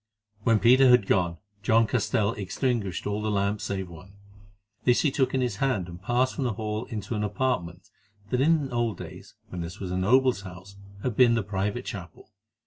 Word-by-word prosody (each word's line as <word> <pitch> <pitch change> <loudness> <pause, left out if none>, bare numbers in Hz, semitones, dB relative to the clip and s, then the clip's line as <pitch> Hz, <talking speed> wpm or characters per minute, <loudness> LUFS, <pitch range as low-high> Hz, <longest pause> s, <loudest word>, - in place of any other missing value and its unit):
When 115 +1 +3
Peter 130 +4 +6
had 125 -5 +6
gone, 85 -3 +1 0.2
John 115 +1 +4
Castell 105 0 0
extinguished 105 -1 -2
all 105 +1 -2
the 110 - -1
lamps 100 0 0
save 95 -2 -3
one. 85 +3 -13 0.7
This 125 -1 +4
he 150 - +2
took 135 -1 0
in 130 - +1
his 125 -1 -1
hand 130 -10 0
and 85 0 -10
passed 125 +5 +1
from 140 - -3
the 120 - 0
hall 110 +2 -3
into 115 -1 -5
an 105 -1 -1
apartment 100 -7 -2 0.4
that 125 - +1
in 150 -2 +2
old 120 -2 0
days, - - -10
when 90 - -5
this 85 +4 -7
was 95 -2 -5
a 90 - -1
noble's 125 +3 +3
house, 95 +1 -11 0.3
had 125 -4 -1
been 120 -1 +5
the 115 - 0
private 100 +4 -2
chapel. 90 +1 -8
105 Hz, 195 wpm, -26 LUFS, 95-125 Hz, 0.7 s, Peter